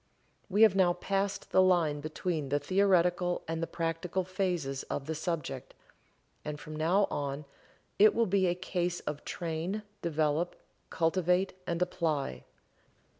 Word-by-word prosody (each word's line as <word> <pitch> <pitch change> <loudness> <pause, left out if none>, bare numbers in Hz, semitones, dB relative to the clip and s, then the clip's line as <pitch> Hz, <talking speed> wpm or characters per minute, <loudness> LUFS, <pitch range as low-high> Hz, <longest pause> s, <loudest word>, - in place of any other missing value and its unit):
We 205 +3 +5
have 215 -4 +6
now 180 -2 +4
passed 195 +2 -2
the 185 - +6
line 170 -5 +3
between 155 0 -3
the 145 - +2
theoretical 180 +1 +2
and 165 0 -2
the 165 - -1
practical 165 +2 -2
phases 175 -7 -2
of 135 - -3
the 160 - -2
subject, 160 -1 -4 0.7
and 150 -1 -5
from 155 +1 -8
now 175 +6 +3
on 140 +1 -3 0.5
it 210 +1 +7
will 230 - +3
be 190 -2 +2
a 175 - +1
case 180 -1 -2
of 150 -1 -5
train, 170 +5 -3 0.2
develop, 160 +1 0 0.3
cultivate 180 +3 +1
and 170 0 -1
apply. 150 - -2
175 Hz, 140 wpm, -31 LUFS, 155-185 Hz, 0.7 s, it